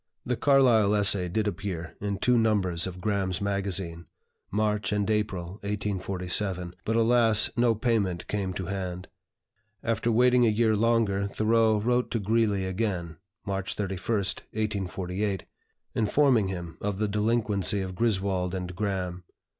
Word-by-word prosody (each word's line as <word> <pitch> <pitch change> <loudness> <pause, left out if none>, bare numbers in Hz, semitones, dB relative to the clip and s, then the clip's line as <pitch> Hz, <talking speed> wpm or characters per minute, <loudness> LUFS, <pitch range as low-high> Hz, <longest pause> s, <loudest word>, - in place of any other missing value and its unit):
The 125 - 0
Carlyle 120 -7 +4
essay 100 -3 +3
did 110 +5 0
appear 90 -4 -4
in 100 -1 -2
two 125 +4 +2
numbers 100 -7 +1
of 90 0 -8
"Graham's 95 -4 -1
Magazine" 95 -4 -2 0.4
(March 105 -1 0
and 105 -1 0
April, 100 -3 -2
1847), 95 -2 -2
but 110 - -1
alas, 115 -1 +4
no 120 -1 +3
payment 105 -6 0
came 100 -3 -2
to 95 0 -4
hand. 90 -1 -5 0.7
After 115 0 0
waiting 125 +2 +4
a 115 - +5
year 110 0 +2
longer, 105 -3 +2
Thoreau 110 +1 +2
wrote 125 +3 +1
to 115 - -1
Greeley 105 -2 +1
again 95 -4 -2 0.3
(March 95 -1 -3
31, 95 -3 -3
1848), 100 -2 -2 0.5
informing 115 -1 +3
him 85 -3 -6
of 100 -1 -2
the 105 +1 0
delinquency 105 -2 0
of 95 -1 -4
Griswold 95 -4 0
and 90 -1 -5
Graham. 90 -3 -3
100 Hz, 135 wpm, -27 LUFS, 95-110 Hz, 0.7 s, a